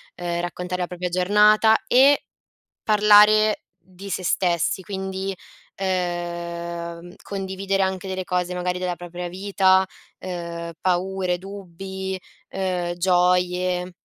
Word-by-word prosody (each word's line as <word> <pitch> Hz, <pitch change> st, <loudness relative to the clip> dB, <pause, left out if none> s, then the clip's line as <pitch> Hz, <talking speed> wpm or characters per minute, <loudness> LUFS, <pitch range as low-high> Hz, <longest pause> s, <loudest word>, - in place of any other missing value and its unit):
ehm, 175 Hz, -1 st, -3 dB
raccontare 180 Hz, +1 st, -4 dB
la 175 Hz, -, -1 dB
propria 180 Hz, 0 st, -4 dB
giornata 210 Hz, +4 st, +5 dB
e 275 Hz, +3 st, +5 dB, 0.6 s
parlare 210 Hz, 0 st, +5 dB
di 185 Hz, +3 st, -12 dB
se 185 Hz, -, -2 dB
stessi, 175 Hz, 0 st, +1 dB
quindi, 190 Hz, 0 st, -4 dB, 0.4 s
ehm, 170 Hz, -1 st, -4 dB
condividere 195 Hz, 0 st, -2 dB
anche 190 Hz, 0 st, -1 dB
delle 185 Hz, 0 st, -3 dB
cose 180 Hz, 0 st, -1 dB
magari 180 Hz, 0 st, -2 dB
della 180 Hz, -1 st, -2 dB
propria 175 Hz, +1 st, -7 dB
vita, 190 Hz, 0 st, +3 dB, 0.3 s
ehm, 170 Hz, -2 st, -5 dB
paure, 185 Hz, 0 st, 0 dB
dubbi, 190 Hz, 0 st, -6 dB, 0.3 s
ehm, 180 Hz, -2 st, -2 dB
gioie. 180 Hz, 0 st, +1 dB
185 Hz, 105 wpm, -23 LUFS, 175-195 Hz, 0.6 s, giornata